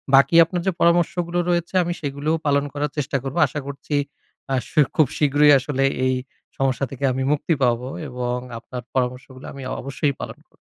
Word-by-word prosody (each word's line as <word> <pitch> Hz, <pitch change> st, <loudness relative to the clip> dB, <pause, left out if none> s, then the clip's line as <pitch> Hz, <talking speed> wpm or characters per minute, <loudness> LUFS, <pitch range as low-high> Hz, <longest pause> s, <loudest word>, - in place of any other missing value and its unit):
বাকি 140 Hz, +5 st, +5 dB
আপনার 175 Hz, +1 st, -3 dB
যে -, -, +4 dB
পরামর্শগুলো 170 Hz, 0 st, +2 dB
রয়েছে 175 Hz, +1 st, 0 dB
আমি 175 Hz, 0 st, -2 dB
সেগুলোও 145 Hz, +2 st, -1 dB
পালন 140 Hz, -1 st, +3 dB
করার 145 Hz, -1 st, -2 dB
চেষ্টা 145 Hz, -1 st, 0 dB
করবো। 135 Hz, +5 st, -5 dB
আশা 155 Hz, -, -5 dB
করছি 140 Hz, +1 st, -4 dB, 0.6 s
আ -, -, +3 dB, 0.4 s
খুব 155 Hz, -4 st, +5 dB
শীঘ্রই 145 Hz, 0 st, +5 dB
আসলে 135 Hz, 0 st, -1 dB, 0.2 s
এই 130 Hz, 0 st, +2 dB, 0.4 s
সমস্যা 135 Hz, 0 st, +1 dB
থেকে 135 Hz, 0 st, -8 dB
আমি 130 Hz, +1 st, -1 dB
মুক্তি 150 Hz, +3 st, +1 dB
পাবো 125 Hz, 0 st, +1 dB, 0.2 s
এবং 125 Hz, -1 st, -2 dB, 0.2 s
আপনার 125 Hz, +1 st, -7 dB
পরামর্শগুলো 130 Hz, +1 st, -3 dB
আমি 140 Hz, -, -9 dB, 0.2 s
অবশ্যই 140 Hz, +2 st, -1 dB
পালন -, -, -7 dB
করবো। -, -, -30 dB
140 Hz, 170 wpm, -22 LUFS, 130-155 Hz, 0.6 s, বাকি